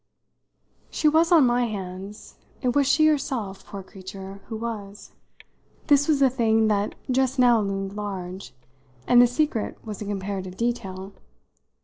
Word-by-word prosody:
She 310 - 0
was 320 +3 +4
on 320 -6 +7
my 245 0 +2
hands 195 -1 -7 0.2
it 250 -1 +1
was 285 -2 +3
she 310 +3 +4
herself, 265 -10 -1
poor 195 -1 -8
creature, 195 +1 -10
who 220 - -5
was: 210 -3 -7 0.7
this 285 -2 +4
was 305 -3 +3
the 275 - +6
thing 225 -3 +2
that 205 0 0 0.2
just 265 +1 +1
now 240 -3 +5
loomed 195 -1 -3
large, 195 -2 -6 0.5
and 245 -1 +6
the 245 - +6
secret 245 -3 -1
was 215 -2 -7
a - - -4
comparative 195 -2 -4
detail. 200 -5 -3
220 Hz, 145 wpm, -24 LUFS, 195-255 Hz, 0.7 s, on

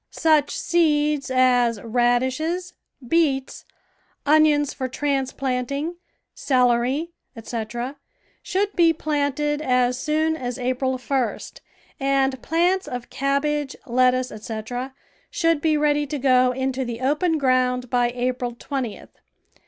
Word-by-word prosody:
Such 310 -3 +2
seeds 300 -4 +1
as 250 -3 +3
radishes, 255 - 0 0.3
beets, 280 -4 0 0.6
onions 295 -1 +4
for 260 - -3
transplanting, 275 +3 -2 0.4
celery, 255 +4 +1 0.2
etc., 235 +3 -5 0.4
should 400 +2 -1
be 335 -2 +5
planted 295 -1 -1
as 250 -3 +1
soon 315 +2 0
as 250 -4 -4
April 255 +1 -1
1st, 255 -1 -3 0.4
and 270 -2 +1
plants 355 +4 +1
of 245 -1 -6
cabbage, 280 +1 -1
lettuce, 255 +1 +2
etc., 225 +5 -6 0.3
should 330 -3 +1
be 310 -1 +2
ready 295 0 +1
to 295 - -3
go 255 -2 +4
into 265 +1 -2
the 235 -2 -5
open 300 +6 +1
ground 255 -2 +1
by 245 -1 +2
April 245 0 -2
20th. 250 -3 -5
265 Hz, 110 wpm, -23 LUFS, 250-300 Hz, 0.6 s, be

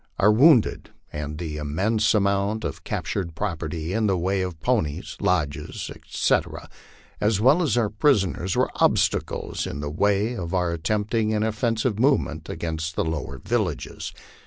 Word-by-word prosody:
Our 105 - +5
wounded, 125 +1 +4 0.2
and 75 0 -4
the 80 -2 -4
immense 100 +10 +1
amount 100 +1 +1
of 75 - -5
captured 85 -5 -3
property 80 -3 -3
in 110 0 +1
the 95 -2 +2
way 95 +2 0
of 90 -3 -4
ponies, 90 -7 -1
lodges, 90 -8 -1
etc., - - -1 0.5
as 105 -1 +2
well 135 +10 +5
as 140 - +1
our 110 -4 +1
prisoners, 100 - +1
were - - +1
obstacles - - +1
in 70 - -5
the 75 0 -4
way 100 +7 +1
of 90 -3 -4
our 90 -2 +1
attempting 110 +5 0
an 105 - +1
offensive 110 0 0
movement 80 - +1
against 80 -1 -3
the - - 0
lower 80 -4 -3
villages. 105 - -2
100 Hz, 150 wpm, -24 LUFS, 80-110 Hz, 0.5 s, Our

